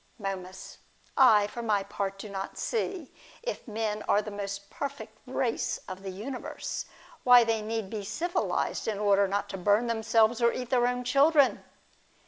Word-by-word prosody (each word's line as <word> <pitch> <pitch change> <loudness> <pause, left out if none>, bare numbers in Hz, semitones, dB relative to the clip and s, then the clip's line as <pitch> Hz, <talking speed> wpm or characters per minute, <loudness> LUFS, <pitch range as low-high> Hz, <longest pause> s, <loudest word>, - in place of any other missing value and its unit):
Momus. 190 -3 -6 0.4
I 220 -6 +6
for 225 +3 -6
my 210 -4 +1
part 195 0 -4
do 205 - -7
not 195 -1 -6
see, 385 - -3 0.3
if - - -5
men 215 -1 -2
are 205 - +5
the 210 0 -5
most 200 0 -6
perfect 270 -6 -6
race 250 -2 -1
of 185 0 -7
the 195 - -6
universe, 220 +8 -5 0.4
why 245 -1 +8
they 225 -1 0
need 220 -2 -3
be 215 -2 -4
civilised 350 - -1
in 215 -2 -1
order 200 -1 +3
not 200 +1 -1
to 195 - -5
burn 205 +5 +3
themselves, 225 0 +2
or 235 0 +5
eat 250 -1 -5
their 245 -2 +3
own 250 0 -1
children. 280 +3 +4
220 Hz, 165 wpm, -28 LUFS, 200-250 Hz, 0.4 s, why